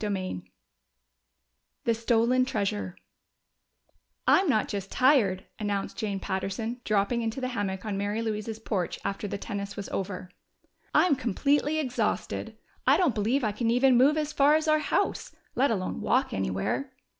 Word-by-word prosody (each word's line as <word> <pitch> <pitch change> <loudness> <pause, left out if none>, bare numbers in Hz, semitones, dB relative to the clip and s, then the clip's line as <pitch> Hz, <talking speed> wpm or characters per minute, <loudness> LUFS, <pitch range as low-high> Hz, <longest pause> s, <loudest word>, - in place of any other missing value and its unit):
CHAPTER 205 -1 0
V 90 - -5 1.3
The 230 - +2
Stolen 235 +2 +2
Treasure 205 -5 -2 1.3
"I'm 380 -3 +4
not 215 -6 +2
just 195 -1 -5
tired," 235 -9 +3
announced 205 -2 -2
Jane 205 -3 -2
Patterson, 200 +6 -3
dropping 215 +3 +1
into 225 +2 -2
the 255 -1 -2
hammock 200 -5 -3
on 200 -2 -2
Mary 205 +3 -1
Louise's 215 0 -3
porch 200 -5 -2
after 200 +1 -2
the 200 - -3
tennis 200 0 -5
was 200 - -5
over. 185 -1 -4 0.6
"I'm 350 -5 +4
completely 285 +6 +1
exhausted! 260 -5 -2 0.3
I - - +6
don't 345 -9 +3
believe 235 +6 +1
I 215 - +1
can 225 +3 -1
even 250 +2 +4
move 275 +5 +5
as 305 0 -1
far 290 +2 +5
as 315 0 0
our 310 0 +4
house 305 - -1 0.2
let 275 +3 +2
alone 190 -5 -2
walk 260 +3 +1
anywhere." 95 - -2
220 Hz, 155 wpm, -28 LUFS, 200-260 Hz, 1.3 s, I